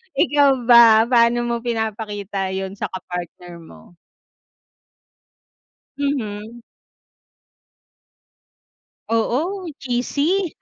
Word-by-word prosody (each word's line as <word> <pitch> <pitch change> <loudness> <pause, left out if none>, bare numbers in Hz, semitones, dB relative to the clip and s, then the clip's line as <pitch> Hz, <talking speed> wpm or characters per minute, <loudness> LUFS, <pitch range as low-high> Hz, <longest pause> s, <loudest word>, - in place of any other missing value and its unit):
Ikaw 285 -4 +3
ba, 235 -2 +7
paano 240 0 +3
mo 235 0 -2
pinapakita 215 -4 -4
yun 190 0 -4
sa - - -2
kapartner 175 -1 -8
mo? 170 +1 -17 2.0
Mhm. 235 -5 -4 2.5
Oo, 310 - -1
cheesy. 290 +9 -1
235 Hz, 70 wpm, -20 LUFS, 205-270 Hz, 2.5 s, ba